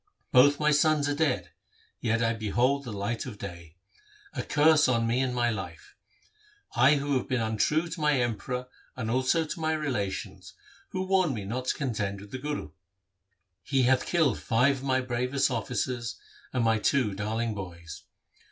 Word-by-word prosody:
Both 145 +3 +6
my 150 0 +3
sons 150 0 +3
are 145 - +1
dead, 145 -3 0 0.5
yet 115 0 +1
I 115 0 +2
behold 120 +6 0
the 120 - -5
light 105 +5 -3
of 110 -5 -7
day. 85 -5 -9 0.6
A - - -2
curse 155 +1 +4
on 115 -2 +2
me 115 +2 +1
and 130 -1 +1
my 120 -1 +2
life! 90 -6 -7 0.8
I 130 +5 +6
have 140 -2 -1
been 130 - 0
untrue 110 +9 +1
to 165 -1 -6
my 150 -3 +3
Emperor 125 +2 -2 0.3
and 115 -3 -3
also 130 +6 +2
to 155 - -6
my 160 0 0
relations, 130 -11 -3 0.3
who 185 - -2
warned 185 -7 +2
me 105 -3 -5
not 125 +5 -3
to - - 0
contend 105 -7 -2
with 100 +1 -12
the 130 - -5
Guru. 145 - -4 0.9
He 135 -2 +1
hath 130 +1 +3
killed 160 -9 +2
five 130 +5 +2
of 130 - -10
my 130 -1 +1
bravest 125 +2 0
officers 125 -2 -2 0.3
and 125 -2 0
my 110 -1 +3
two 115 -2 +1
darling 110 +3 -2
boys. 85 -4 -8
125 Hz, 170 wpm, -28 LUFS, 110-145 Hz, 0.9 s, Both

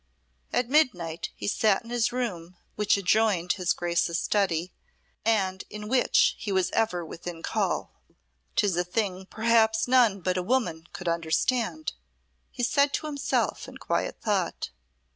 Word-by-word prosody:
At 245 -1 +1
midnight 185 - +1
he - - -5
sate 205 -1 +2
in 230 - -11
his 240 -2 +1
room, 185 -9 -4 0.2
which 210 -1 +2
adjoined 195 -2 +2
his 180 -2 0
Grace's 170 -1 0
study, 180 -4 0 0.5
and 195 -4 +1
in 210 0 -7
which 250 +2 +3
he 205 0 -4
was 190 -1 +1
ever 180 -7 0
within 165 +1 -8
call. - - -1 0.6
"'Tis 200 -4 +2
a 175 - +1
thing 190 0 -2
perhaps 220 0 +2
none 240 -6 +4
but 185 +1 0
a - - +1
woman 180 -7 -1
could 180 - -7
understand," 225 - 0 0.6
he 245 - -5
said 280 +3 +3
to - - -1
himself 290 -2 -1
in - - -10
quiet - - -2
thought. 195 - -1
200 Hz, 145 wpm, -27 LUFS, 175-230 Hz, 0.6 s, none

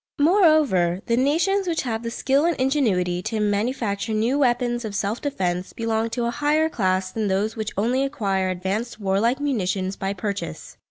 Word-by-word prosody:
Moreover, 295 - +3
the 235 - +1
nations 340 +10 +1
which 330 -2 0
have 225 -3 -2
the 230 - -4
skill 270 +4 +1
and 340 -4 0
ingenuity 205 -11 +1
to 220 +4 -3
manufacture 210 +1 -1
new 235 +6 +1
weapons 240 -2 +1
of 215 -2 -5
self 205 +3 -2
defence 185 -10 -2
belong 225 0 -1
to 240 +1 -2
a 235 - 0
higher 300 +4 +1
class 185 -7 0
than 220 0 -2
those 200 +3 0
which 220 -2 -3
only 245 +6 +1
acquire 195 -9 -1
advanced 195 +6 -3
warlike 205 +6 +1
munitions 195 -9 -1
by 195 0 -3
purchase. 200 +1 -5
225 Hz, 170 wpm, -23 LUFS, 195-270 Hz, -, Moreover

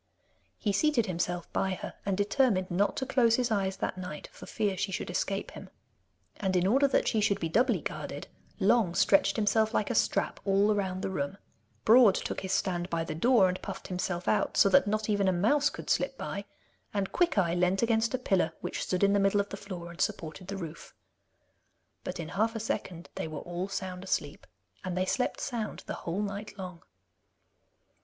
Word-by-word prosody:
He 210 - 0
seated 255 +1 +2
himself 175 -2 -3
by 190 -1 0
her, - - -7
and 195 -2 +1
determined 205 -3 +2
not 200 +4 +1
to 265 - -1
close 235 -4 +3
his 245 -2 0
eyes 195 -2 0
that 190 - -3
night, 165 -5 -7
for - - -12
fear 205 -3 -1
she 195 +1 -2
should 175 - -3
escape 195 +2 -2
him. - - -10 0.7
And 190 -2 -1
in 180 0 +3
order 270 +8 +4
that 270 - +1
she 220 - +2
should 200 -1 +2
be 165 - -2
doubly 240 +10 +2
guarded, - - -5 0.3
Long 205 -3 +3
stretched 195 - +4
himself 220 +1 +2
like - - +1
a - - 0
strap - - +1
all 200 +2 +3
round 190 -2 -2
the 195 - -2
room, 145 +2 -3 0.5
Broad 225 -3 +7
took - - -3
his 190 - -4
stand 180 -2 0
by 165 -2 -1
the 165 - -4
door 225 +4 +4
and 185 0 -3
puffed - - -7
himself 180 -1 -3
out, - - +1
so 200 - +6
that 275 +1 +5
not 215 +1 0
even 205 -2 +2
a - - +4
mouse 275 +11 +3
could - - -9
slip 270 -1 0
by, 200 0 -5 0.5
and 195 -1 -1
Quickeye 200 - +2
leant 180 +4 +2
against 230 +1 +2
a - - 0
pillar 190 -9 +1
which - - -4
stood 185 +1 -1
in 200 0 +5
the 200 - +3
middle 195 +1 +3
of 200 0 -1
the - - -5
floor 180 -4 -7
and 170 - -7
supported 165 +3 -3
the 200 0 -4
roof. 165 -3 -8 1.1
But - - -5
in 165 -1 -5
half 225 +4 0
a - - -2
second 185 -5 -4
they - - -4
were 155 -2 -6
all 175 +2 -4
sound 190 -1 -5
asleep, 150 -6 -3 0.4
and 180 -1 -3
they 185 - +1
slept 250 +6 -1
sound 235 -5 -4
the - - -4
whole 180 +5 -3
night 205 +1 -5
long. 180 -3 -7
195 Hz, 205 wpm, -29 LUFS, 180-215 Hz, 1.1 s, Broad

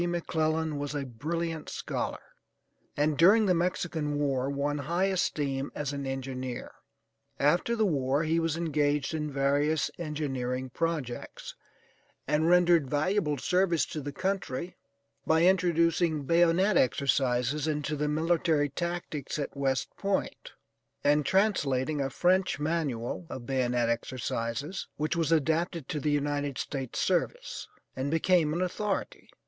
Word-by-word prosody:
McClellan 160 -3 -1
was 145 0 -4
a 140 -1 -2
brilliant 160 +6 -3
scholar, - - -4 0.7
and 150 0 +1
during 205 +6 +6
the 185 - +4
Mexican 165 -4 -1
war 135 -2 0
won 145 +1 -1
high 170 +7 0
esteem 145 -8 -1
as 145 -1 -3
an 140 -1 -4
engineer. 130 -2 -4 0.7
After 175 +11 +2
the 220 -2 +2
war 140 -4 +1
he 165 +1 +1
was 165 -1 0
engaged 150 -3 0
in 150 -1 -2
various 140 +2 +1
engineering 130 -5 -3
projects, 155 -6 -3 0.7
and 150 +3 +2
rendered 175 -5 +4
valuable 150 +1 +1
service 180 +3 +2
to 155 - -3
the 145 +1 -5
country 180 -2 -3 0.5
by 160 +1 +4
introducing 170 -3 +3
bayonet 175 +5 +3
exercises 135 +1 +1
into 150 0 -1
the 150 0 -1
military 160 -1 +1
tactics 170 -2 -4
at 145 -1 -4
West 135 -1 -1
Point, 200 -1 -2 0.5
and 145 0 +3
translating 150 -8 +1
a 135 - -1
French 180 +3 +2
Manual 150 -2 -2
of 120 - -7
Bayonet 125 -2 +1
Exercises, 120 +6 -3
which 155 +2 -1
was 165 -1 0
adapted 160 0 +1
to 150 - -2
the 150 - -1
United 145 -1 -1
States 135 -4 -4
service, - - -1 0.3
and 130 +2 -2
became 165 0 +3
an 170 +4 0
authority. 195 +2 -3
150 Hz, 130 wpm, -29 LUFS, 140-170 Hz, 0.7 s, during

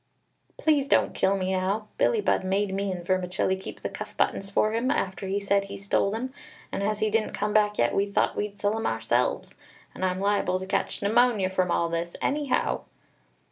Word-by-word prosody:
"Please 295 -3 +2
don't - - +3
kill 195 +1 +2
me 185 0 -1
now. 190 +3 -1
Billie 485 -3 +3
Budd - - +1
made 195 +1 0
me 195 0 -1
and 175 -2 -5
Vermicelli 185 0 0
keep 190 - -9
the - - -2
cuff - - -8
buttons 195 - 0
for 215 +2 +2
him, 235 +3 0
after 190 -3 -1
he 195 +1 0
said 200 0 +1
he 200 0 -7
stole 195 0 +1
them; 240 +5 -4 0.4
and - - -3
as 210 +1 -1
he 215 -1 +2
didn't 220 0 0
come 210 +1 -1
back 210 -1 +3
yet, 120 - +2
we 200 +1 +2
thought 200 - +1
we'd 205 -1 -3
sell 205 +1 +1
'em 225 - -1
ourselves. 115 +2 0 0.4
And - - -6
I'm 185 0 0
liable 200 -2 +1
to 190 - -5
catch 195 +1 -2
pneumonia 215 -3 +3
from 185 -1 +1
all 170 0 +2
this, 170 +1 -3
anyhow!" 285 -2 0
200 Hz, 205 wpm, -26 LUFS, 185-215 Hz, 0.4 s, don't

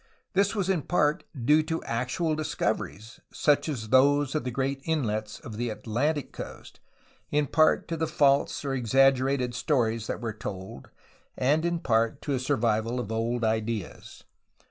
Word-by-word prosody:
This 200 +3 +2
was 195 -3 0
in 190 -5 +1
part 150 -1 +1
due 150 +6 +4
to 160 +1 -3
actual 125 +8 -1
discoveries, 120 -7 -3
such 150 +1 +2
as 115 -7 -4
those 140 +2 +4
of 155 - -1
the 125 - -2
great 135 +2 -2
inlets 110 -9 -2
of 110 -3 -9
the 120 +1 -1
Atlantic 120 +8 -2
coast, - - -9 0.5
in 150 0 +2
part 155 +2 +3
to 165 - -2
the 160 0 0
false 140 0 +2
or 135 - -1
exaggerated 135 0 +2
stories 115 -4 0
that - - -3
were 115 -3 -4
told, 95 -9 -7 0.5
and 145 +5 +2
in 170 0 +1
part 115 -8 +1
to 145 - -1
a 130 - 0
survival 120 -3 0
of 110 -3 -4
old 115 +2 -1
ideas. 110 -2 -3
130 Hz, 160 wpm, -27 LUFS, 115-150 Hz, 0.5 s, due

